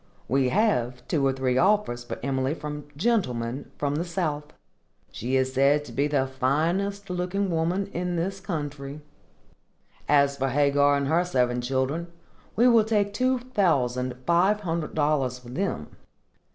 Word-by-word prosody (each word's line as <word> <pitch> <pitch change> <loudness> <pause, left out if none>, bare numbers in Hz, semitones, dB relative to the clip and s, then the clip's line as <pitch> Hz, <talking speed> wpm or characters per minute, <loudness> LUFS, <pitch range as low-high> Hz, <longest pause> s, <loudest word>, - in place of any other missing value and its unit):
We 130 +1 +2
have 125 - 0
two 140 -4 +1
or - - +3
three 130 -1 0
offers 190 -11 +2
for 120 - -6
Emily 135 +2 0
from 150 -2 -6
gentlemen 135 - -1
from 145 0 -1
the 165 - 0
south. 165 -5 -2 0.7
She 125 +4 -2
is 130 0 +1
said 140 +2 +3
to - - -10
be 140 +5 +1
the 140 -3 +1
finest 170 +10 -1
looking 180 +2 -1
woman 170 +4 0
in 180 +1 -2
this 190 +3 -2
country. 145 -5 -5 1.1
As 140 -1 +4
for 135 0 0
Hagar 145 +1 +3
and 140 -1 -1
her 165 +4 +3
seven 125 -8 0
children, 135 +6 -1 0.5
we 240 +3 +5
will 230 -3 +6
take 205 -2 0
two 255 +4 +2
thousand 140 - 0
five 185 +5 +3
hundred 165 -4 -3
dollars 145 -4 +1
for 125 -1 -13
them. 130 - -3
145 Hz, 150 wpm, -26 LUFS, 130-180 Hz, 1.1 s, will